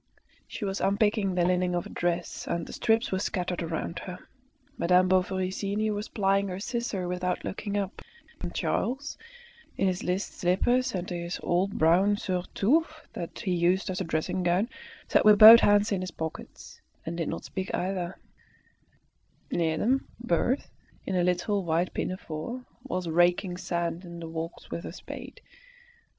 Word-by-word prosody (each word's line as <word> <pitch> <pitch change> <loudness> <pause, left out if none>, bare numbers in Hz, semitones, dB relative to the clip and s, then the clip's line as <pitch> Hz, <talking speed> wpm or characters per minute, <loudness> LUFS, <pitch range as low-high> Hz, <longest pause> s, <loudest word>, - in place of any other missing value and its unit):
She 215 - -5
was 195 0 -2
unpicking 200 -1 +2
the 175 -1 +2
lining 180 0 +1
of 175 - -1
a - - -8
dress, 175 0 -2
and 170 -1 -2
the - - -9
strips 225 +2 +1
were 190 - 0
scattered 180 -2 -2
around 165 0 -3
her. 180 -1 -7 0.6
Madame 180 -2 +4
Bovary 185 0 +1
senior 210 +2 -1
was 205 +1 -4
plying 200 -1 +1
her 185 0 -4
scissor 215 -4 -2
without 180 0 -2
looking 205 +1 -3
up, 200 -1 -3 0.4
and - - -4
Charles, 275 +4 -1 0.6
in - - +1
his 185 -1 -1
list 180 +3 -2
slippers 240 +7 +2
and 180 0 -3
his 175 0 -4
old 185 +3 0
brown 185 +6 +4
surtout 205 - +1 0.3
that 170 - -6
he 200 -5 -1
used 180 +3 +2
as 185 - -3
a - - +1
dressing 160 +2 -1
gown, 180 +6 +1 0.4
sat - - +3
with 210 -1 +7
both 220 +2 +12
hands 205 0 +4
in 195 -2 0
his 185 - -3
pockets, 160 -2 -8 0.2
and 165 - -4
did 165 - -1
not - - -5
speak 190 0 -4
either; 185 -1 -2 1.3
near 160 -2 +1
them 260 +8 +1
Berthe, 240 +4 +1 0.4
in 190 - -2
a 180 - +2
little 180 +3 +1
white 170 +1 0
pinafore, 185 +7 -4 0.2
was 185 -9 -3
raking 175 +2 +2
sand 170 0 -2
in 170 -1 -9
the 165 - -6
walks 165 +1 -6
with 170 - -4
her - - -6
spade. - - -9
185 Hz, 165 wpm, -28 LUFS, 175-205 Hz, 1.3 s, both